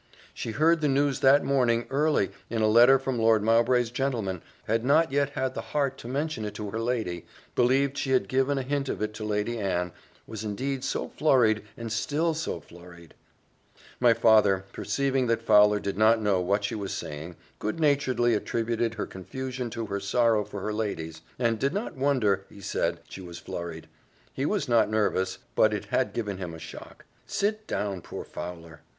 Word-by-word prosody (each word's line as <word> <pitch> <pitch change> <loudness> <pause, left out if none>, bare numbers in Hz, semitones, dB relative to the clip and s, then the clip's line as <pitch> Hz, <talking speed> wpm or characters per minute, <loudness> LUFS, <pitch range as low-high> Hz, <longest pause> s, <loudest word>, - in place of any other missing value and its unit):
"She - - -5
heard 165 +4 +3
the 150 - +2
news 140 0 +1
that 135 +2 +5
morning, 120 -4 +2
early, 140 - +2 0.2
in 115 -1 -1
a - - +4
letter 120 +5 +7
from 130 -2 -3
Lord 110 -2 +4
Mowbray's 115 +1 +3
gentleman 115 -9 -2 0.2
had 115 +1 0
not 150 +4 +3
yet 140 0 +1
had 130 -1 -1
the - - -4
heart 140 -2 -2
to - - -9
mention 140 -1 -2
it 105 -1 -5
to 105 -1 -5
her 110 - -3
lady 110 -8 -2 0.3
believed 135 +3 +2
she 135 - -2
had 130 -1 +2
given 135 +2 +1
a 135 - -1
hint 140 +1 -2
of - - -3
it 105 0 -2
to 110 - -7
Lady 105 +2 -1
Anne 90 -3 -1 0.3
was 110 -1 -7
indeed 130 +6 -3
so - - -2
flurried, 120 -8 +3 0.2
and 115 -1 -6
still 150 +8 0
was 160 -1 -2
so 85 - -3
flurried 85 +1 -15 0.5
" - - -26
My 120 -2 +5
father, 105 -4 +4
perceiving 135 -2 0
that 115 0 0
Fowler 105 -1 +5
did 100 0 -4
not 110 +1 +5
know 100 -4 +1
what 100 +3 0
she 100 - -2
was 100 -3 -4
saying, 75 +4 -6 0.2
good 110 +9 -3
naturedly 135 -5 +2
attributed 115 +1 -1
her 105 - -3
confusion 125 +5 -5
to 115 0 -4
her 100 -1 -3
sorrow 110 +2 +2
for 100 -1 -7
her 105 +2 -2
ladies; 80 -7 -4 0.2
and 115 -3 +1
did 140 - 0
not 210 +4 -3
wonder, 125 -8 +1
he - - -14
said, 100 - -2
she 95 - -9
was 85 -2 -9
flurried: 85 -2 -7 0.5
he 135 +2 -1
was 200 -9 -1
not 115 -3 +3
nervous, 95 -3 0 0.2
but - - +4
it - - -5
had - - 0
given 100 -5 -3
him 85 -3 -5
a - - -10
shock. - - -11 0.2
"Sit 215 +1 -1
down, 100 -3 -2
poor - - -7
Fowler." 85 -2 -8
115 Hz, 195 wpm, -27 LUFS, 100-135 Hz, 0.5 s, letter